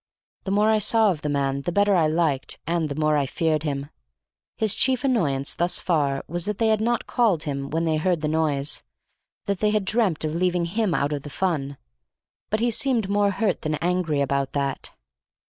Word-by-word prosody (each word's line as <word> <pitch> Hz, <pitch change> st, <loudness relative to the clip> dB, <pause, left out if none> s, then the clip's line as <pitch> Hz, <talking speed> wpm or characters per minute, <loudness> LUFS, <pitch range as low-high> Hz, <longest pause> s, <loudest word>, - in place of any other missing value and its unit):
The -, -, -3 dB
more 210 Hz, +2 st, +3 dB
I 215 Hz, -, +3 dB
saw 215 Hz, 0 st, +4 dB
of 155 Hz, -4 st, -5 dB
the 150 Hz, -, -2 dB
man 140 Hz, -1 st, 0 dB
the 175 Hz, -, -3 dB
better 205 Hz, +2 st, +3 dB
I 165 Hz, -4 st, +3 dB
liked 155 Hz, -4 st, 0 dB
and 165 Hz, -1 st, -1 dB
the 140 Hz, -, -4 dB
more 155 Hz, 0 st, +1 dB
I 140 Hz, -2 st, 0 dB
feared 155 Hz, +2 st, 0 dB
him. 145 Hz, -2 st, -4 dB, 0.7 s
His 215 Hz, -2 st, +2 dB
chief 260 Hz, +2 st, +2 dB
annoyance 150 Hz, -, 0 dB
thus 175 Hz, +1 st, 0 dB
far 145 Hz, -6 st, 0 dB
was 175 Hz, +1 st, -3 dB
that 210 Hz, -1 st, -3 dB
they 225 Hz, -1 st, +2 dB
had 215 Hz, -1 st, +2 dB
not 235 Hz, +1 st, 0 dB
called 205 Hz, -10 st, +1 dB
him 140 Hz, -2 st, -4 dB
when 165 Hz, +2 st, -1 dB
they 160 Hz, -1 st, +1 dB
heard 170 Hz, 0 st, 0 dB
the 155 Hz, -, -1 dB
noise, 150 Hz, -2 st, 0 dB, 0.6 s
that 200 Hz, -3 st, -2 dB
they 210 Hz, -, +2 dB
had 210 Hz, -2 st, 0 dB
dreamt 200 Hz, -6 st, +1 dB
of 155 Hz, -, -2 dB
leaving 180 Hz, 0 st, +1 dB
him 200 Hz, +1 st, 0 dB
out 145 Hz, +1 st, 0 dB
of 145 Hz, -, -3 dB
the 145 Hz, -, -9 dB
fun. 145 Hz, -5 st, -2 dB, 0.7 s
But 215 Hz, +1 st, -1 dB
he 240 Hz, 0 st, +2 dB
seemed 230 Hz, -4 st, +1 dB
more 205 Hz, 0 st, +2 dB
hurt 200 Hz, -1 st, -1 dB
than 155 Hz, 0 st, -1 dB
angry 165 Hz, -2 st, 0 dB
about 140 Hz, -1 st, -1 dB
that. 140 Hz, -2 st, -3 dB
170 Hz, 210 wpm, -24 LUFS, 145-205 Hz, 0.7 s, saw